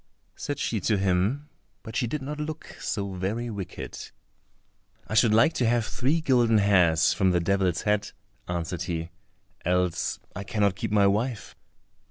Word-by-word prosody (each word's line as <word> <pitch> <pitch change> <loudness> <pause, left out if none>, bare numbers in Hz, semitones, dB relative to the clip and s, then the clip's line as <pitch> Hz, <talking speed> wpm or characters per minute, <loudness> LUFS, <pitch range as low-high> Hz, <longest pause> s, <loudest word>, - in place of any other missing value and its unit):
said 145 - -4
she 115 -6 -1
to 105 +2 +1
him, 100 +10 +1 0.4
but 110 -2 -9
she 120 +1 +1
did 145 +3 -3
not 150 +2 -5
look 155 +1 -6
so 100 -3 -3
very 105 +6 -2
wicked. 95 -4 -7 1.0
"I - - -5
should 110 +1 +5
like 115 +9 +5
to 120 - +1
have 120 -1 +2
three 140 +8 0
golden 120 -7 +3
hairs 90 -6 +4
from 95 - +2
the 90 -1 +3
devil's 95 0 +1
head," 105 0 +1 0.4
answered 85 0 -3
he, 85 -1 -3 0.5
"else 90 0 0 0.2
I 100 - -4
cannot 100 0 +1
keep 95 - -3
my 105 -1 +4
wife." 110 +4 -1
105 Hz, 160 wpm, -26 LUFS, 90-120 Hz, 1.0 s, should